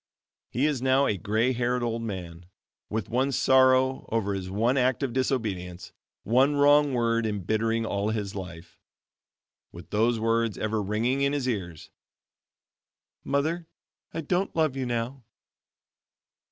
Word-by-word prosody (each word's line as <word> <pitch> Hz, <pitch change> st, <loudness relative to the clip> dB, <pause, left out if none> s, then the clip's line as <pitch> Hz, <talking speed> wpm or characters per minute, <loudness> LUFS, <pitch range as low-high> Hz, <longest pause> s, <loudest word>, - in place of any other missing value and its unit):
He 130 Hz, +4 st, 0 dB
is 145 Hz, -5 st, 0 dB
now 130 Hz, +1 st, +3 dB
a 105 Hz, -, +1 dB
gray 110 Hz, +7 st, 0 dB
haired 125 Hz, 0 st, 0 dB
old 115 Hz, -1 st, -2 dB
man, 90 Hz, -5 st, -6 dB, 0.4 s
with 110 Hz, -2 st, -3 dB
one 130 Hz, +4 st, 0 dB
sorrow 130 Hz, 0 st, +3 dB
over 105 Hz, -3 st, 0 dB
his 95 Hz, -1 st, -4 dB
one 115 Hz, +7 st, +1 dB
act 130 Hz, 0 st, +1 dB
of 130 Hz, -4 st, -2 dB
disobedience, 95 Hz, -9 st, -2 dB, 0.3 s
one 130 Hz, +6 st, +3 dB
wrong 145 Hz, -1 st, +4 dB
word 115 Hz, -1 st, +1 dB
embittering 110 Hz, +3 st, -1 dB
all 100 Hz, -1 st, -1 dB
his 105 Hz, -3 st, -3 dB
life 85 Hz, -3 st, -9 dB, 0.9 s
with 85 Hz, 0 st, -12 dB
those 115 Hz, +2 st, +2 dB
words 115 Hz, -1 st, 0 dB
ever 110 Hz, 0 st, -1 dB
ringing 115 Hz, +7 st, 0 dB
in 140 Hz, +1 st, +2 dB
his 140 Hz, -3 st, -1 dB
ears, 90 Hz, -9 st, -4 dB, 1.3 s
"Mother, 160 Hz, +4 st, -1 dB, 0.4 s
I 165 Hz, -, -4 dB
don't 180 Hz, +5 st, -1 dB
love 155 Hz, -4 st, +1 dB
you 130 Hz, -2 st, -2 dB
now." 120 Hz, +3 st, -3 dB
115 Hz, 140 wpm, -27 LUFS, 105-130 Hz, 1.3 s, wrong